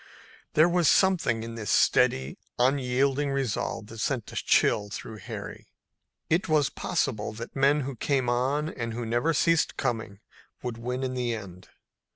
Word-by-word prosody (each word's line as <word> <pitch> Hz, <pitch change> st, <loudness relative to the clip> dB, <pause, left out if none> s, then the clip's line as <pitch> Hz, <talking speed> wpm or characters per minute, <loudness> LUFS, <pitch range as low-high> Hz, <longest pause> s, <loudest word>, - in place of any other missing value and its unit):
There 155 Hz, +2 st, +6 dB
was 175 Hz, -2 st, +2 dB
something 170 Hz, -, +3 dB
in 115 Hz, 0 st, -6 dB
this 110 Hz, -3 st, -5 dB
steady, 65 Hz, 0 st, +2 dB, 0.2 s
unyielding 135 Hz, +2 st, +1 dB
resolve 135 Hz, -6 st, -2 dB
that 110 Hz, +1 st, -11 dB
sent 125 Hz, 0 st, -2 dB
a -, -, -10 dB
chill 105 Hz, -1 st, +2 dB
through 110 Hz, +2 st, -7 dB
Harry. 95 Hz, -, -8 dB, 0.6 s
It 165 Hz, +1 st, +1 dB
was 150 Hz, -4 st, +3 dB
possible 110 Hz, -5 st, -2 dB
that 115 Hz, +2 st, -8 dB
men 140 Hz, +2 st, +3 dB
who 135 Hz, 0 st, -5 dB
came 130 Hz, +1 st, 0 dB
on 130 Hz, +5 st, +1 dB
and 115 Hz, -6 st, -5 dB
who 120 Hz, 0 st, -3 dB
never 120 Hz, +8 st, +1 dB
ceased 165 Hz, +1 st, +2 dB
coming 110 Hz, -6 st, -2 dB, 0.4 s
would 120 Hz, -2 st, -4 dB
win 125 Hz, +2 st, -3 dB
in 130 Hz, -1 st, -2 dB
the 120 Hz, -2 st, -1 dB
end. 90 Hz, -4 st, -10 dB
125 Hz, 160 wpm, -27 LUFS, 115-140 Hz, 0.6 s, There